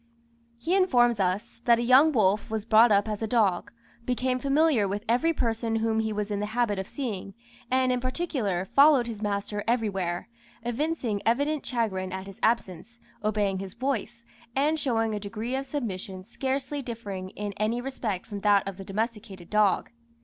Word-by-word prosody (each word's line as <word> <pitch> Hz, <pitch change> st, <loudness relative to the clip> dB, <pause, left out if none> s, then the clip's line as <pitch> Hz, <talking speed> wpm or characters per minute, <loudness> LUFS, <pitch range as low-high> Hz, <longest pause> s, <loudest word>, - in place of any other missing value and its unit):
He 280 Hz, +10 st, -2 dB
informs 245 Hz, -, +3 dB
us, 200 Hz, +5 st, -1 dB
that 235 Hz, -1 st, +6 dB
a 235 Hz, -, -1 dB
young 260 Hz, +6 st, +6 dB
wolf 210 Hz, -5 st, +2 dB
was 220 Hz, -1 st, -3 dB
brought 225 Hz, +1 st, +6 dB
up 200 Hz, +1 st, +3 dB
as 215 Hz, -1 st, -3 dB
a 220 Hz, -, -1 dB
dog, 210 Hz, -6 st, +1 dB, 0.3 s
became 255 Hz, +1 st, 0 dB
familiar 280 Hz, -5 st, +3 dB
with 205 Hz, +3 st, -4 dB
every 250 Hz, +9 st, +3 dB
person 230 Hz, -5 st, -1 dB
whom 225 Hz, 0 st, +1 dB
he 220 Hz, 0 st, -1 dB
was 210 Hz, 0 st, -3 dB
in 205 Hz, -, -1 dB
the 210 Hz, -, -2 dB
habit 215 Hz, -5 st, +1 dB
of 190 Hz, -, -4 dB
seeing, 210 Hz, -8 st, -5 dB, 0.3 s
and 255 Hz, 0 st, +2 dB
in 250 Hz, -, +1 dB
particular, 255 Hz, -, -2 dB
followed 280 Hz, +2 st, +5 dB
his 225 Hz, -3 st, -5 dB
master 205 Hz, 0 st, -2 dB
everywhere, 195 Hz, -7 st, -1 dB, 0.4 s
evincing 240 Hz, -3 st, -1 dB
evident 285 Hz, +6 st, +1 dB
chagrin 195 Hz, -7 st, -2 dB
at 190 Hz, 0 st, -5 dB
his 195 Hz, -1 st, -11 dB
absence, 230 Hz, 0 st, -1 dB, 0.2 s
obeying 205 Hz, -2 st, 0 dB
his 195 Hz, +1 st, -7 dB
voice, 240 Hz, -2 st, -3 dB, 0.3 s
and 300 Hz, +4 st, +2 dB
showing 225 Hz, -5 st, 0 dB
a 210 Hz, -, -2 dB
degree 215 Hz, +5 st, -4 dB
of 270 Hz, +1 st, -3 dB
submission 195 Hz, -8 st, -4 dB
scarcely 270 Hz, +4 st, -3 dB
differing 205 Hz, -7 st, -6 dB
in 205 Hz, -1 st, -3 dB
any 220 Hz, +3 st, 0 dB
respect 245 Hz, -7 st, -3 dB
from 205 Hz, -2 st, -6 dB
that 200 Hz, -1 st, +3 dB
of 195 Hz, -2 st, -5 dB
the 195 Hz, -, -7 dB
domesticated 210 Hz, -3 st, -4 dB
dog. 210 Hz, -, +2 dB
225 Hz, 175 wpm, -27 LUFS, 200-250 Hz, 0.4 s, that